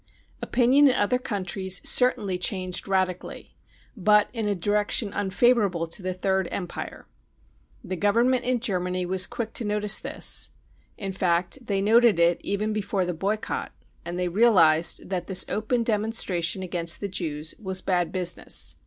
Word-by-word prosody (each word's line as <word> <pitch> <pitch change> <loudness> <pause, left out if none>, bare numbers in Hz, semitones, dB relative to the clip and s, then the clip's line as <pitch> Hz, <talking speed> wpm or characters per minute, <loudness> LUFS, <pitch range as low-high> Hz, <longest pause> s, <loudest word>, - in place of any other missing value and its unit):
Opinion 260 +4 +4
in 260 - +3
other 250 +5 +1
countries 190 -5 -3
certainly 205 -7 +3
changed 185 -1 -2
radically, 185 -2 -2 0.4
but 210 0 +3
in 225 -3 -3
a 205 - 0
direction 205 +3 -1
unfavourable 200 -2 +1
to 165 +4 -5
the 185 0 -3
Third 190 0 0
Empire. 180 -3 -6 0.8
The 185 - -5
Government 235 +6 +2
in 250 0 0
Germany 180 -5 -1
was 185 0 +2
quick 225 -1 -5
to - - 0
notice 210 0 +2
this; - - 0 0.5
in 195 - -4
fact 185 +6 -1
they 195 -1 0
noted 230 -1 +4
it 170 0 +2
even 210 +2 -2
before 200 -3 -1
the 180 - -3
boycott, 200 +6 -3 0.3
and 175 +1 -6
they 180 0 -1
realised 175 -5 +3
that 180 -2 -3
this 190 -2 +5
open 225 +3 -1
demonstration 205 -5 0
against 170 -2 -1
the 200 - -3
Jews 155 -5 -3
was 190 -2 -1
bad 175 -3 0
business. 180 -2 -2
195 Hz, 150 wpm, -25 LUFS, 180-215 Hz, 0.8 s, this